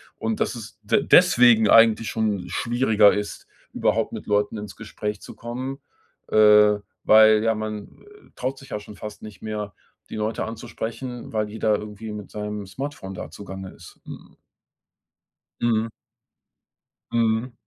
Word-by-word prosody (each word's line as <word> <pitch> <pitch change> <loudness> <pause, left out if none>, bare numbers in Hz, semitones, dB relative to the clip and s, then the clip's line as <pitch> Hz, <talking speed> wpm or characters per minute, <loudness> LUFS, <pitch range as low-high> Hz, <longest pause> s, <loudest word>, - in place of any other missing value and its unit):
Und 110 -1 -3
dass - - -1
es 110 -1 -10
de 105 - +2
deswegen 120 - +6
eigentlich 115 0 +5
schon 105 -5 -1
schwieriger 115 -4 +3
ist, 105 0 -4 0.3
überhaupt - - 0
mit - - -7
Leuten 105 +1 0
ins 105 -2 -8
Gespräch 105 -1 -5
zu - - -11
kommen, 130 +4 -6 0.5
äh, 105 -1 +6 0.3
weil 110 0 +6
ja, 115 0 +2
man, 105 -1 -6
äh, 415 0 -19
traut 130 +2 -3
sich 135 0 -14
ja 105 - -3
schon 105 0 -12
fast 105 +2 -9
nicht 105 -2 -11
mehr, 105 -2 -4 0.4
die - - -7
Leute 110 +1 -2
anzusprechen, 115 +2 -6
weil 105 -1 -1
jeder 110 0 +1
irgendwie 105 +1 -8
mit 105 -2 -8
seinem 105 -1 -5
Smartphone 95 0 -6
da 90 -4 -7
zugange 95 +1 -9
ist. 85 - -15
Mhm. - - -11 1.3
Mhm. 115 -1 +1 1.2
Mhm. 115 +1 +1
110 Hz, 145 wpm, -23 LUFS, 105-115 Hz, 1.3 s, deswegen